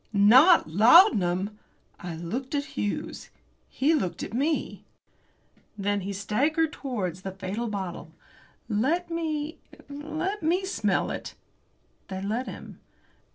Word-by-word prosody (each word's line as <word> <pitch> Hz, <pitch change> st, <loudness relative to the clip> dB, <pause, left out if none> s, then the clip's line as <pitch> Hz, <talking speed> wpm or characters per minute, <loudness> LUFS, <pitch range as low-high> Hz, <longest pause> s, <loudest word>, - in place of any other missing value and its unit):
NOT 255 Hz, -, +6 dB
laudanum! 205 Hz, -, +5 dB, 0.4 s
I 175 Hz, -2 st, -6 dB
looked 240 Hz, -, -4 dB
at 285 Hz, 0 st, -3 dB
Hughes. 205 Hz, -, -4 dB, 0.4 s
He 290 Hz, +5 st, +1 dB
looked 185 Hz, -, -1 dB
at 200 Hz, -, -7 dB
me. 295 Hz, +6 st, -1 dB, 0.9 s
Then 205 Hz, 0 st, -1 dB
he 195 Hz, +2 st, -4 dB
staggered 280 Hz, -, 0 dB
towards 190 Hz, -, -4 dB
that 190 Hz, 0 st, -7 dB
fatal 205 Hz, +6 st, -3 dB
bottle. 190 Hz, -5 st, -5 dB, 0.6 s
"Let 295 Hz, +12 st, 0 dB
me 315 Hz, -2 st, -3 dB, 0.3 s
let 315 Hz, +8 st, -4 dB
me 350 Hz, +4 st, +1 dB
smell 380 Hz, -, 0 dB
it." -, -, -6 dB, 0.7 s
They 190 Hz, -1 st, -5 dB
let 220 Hz, +6 st, -2 dB
him. -, -, -9 dB
235 Hz, 115 wpm, -26 LUFS, 195-310 Hz, 0.9 s, NOT